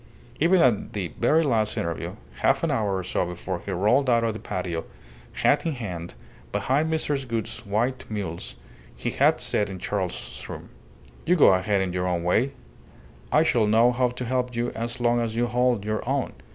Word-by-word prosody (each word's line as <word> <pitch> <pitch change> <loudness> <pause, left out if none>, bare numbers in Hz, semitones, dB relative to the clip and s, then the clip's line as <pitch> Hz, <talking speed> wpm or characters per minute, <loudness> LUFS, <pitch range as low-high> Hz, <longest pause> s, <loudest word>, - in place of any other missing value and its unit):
Even 170 +3 +4
at 120 -7 +2
the 95 -4 -3
very 160 +2 +4
last 110 -7 +1
interview, 85 -1 -3 0.2
half - - +2
an - - +1
hour 100 -3 0
or 95 - -3
so 90 - 0
before 90 +1 -4
he - - -7
rolled 110 +9 +2
out 115 -1 +4
of 115 -1 0
the 110 - -7
patio, 90 -3 -3 0.5
hat - - +2
in 165 - -1
hand, 90 -9 -6 0.4
behind 150 +5 +1
Mrs. 145 -4 -1
Gould's 115 +1 -3
white 120 +6 0
mules, 100 -6 -5 0.4
he - - -3
had - - +3
said 105 -1 0
in 95 - -6
Charles's 95 0 -4
room - - -8 0.6
"You 180 - +5
go 150 - +7
ahead 95 +2 +1
in 95 -2 -2
your 90 0 -1
own 85 -2 -1
way, 90 +8 +3
and 140 - -8 0.8
I 155 - +5
shall 120 -9 +2
know 115 +3 +5
how 125 0 +1
to 125 +1 -5
help 125 0 -1
you 120 +1 -1
as 115 +2 -4
long 120 0 +2
as 115 -1 -2
you 120 +1 +2
hold 120 -2 +1
your 110 0 -1
own. - - 0
115 Hz, 195 wpm, -25 LUFS, 95-125 Hz, 0.8 s, go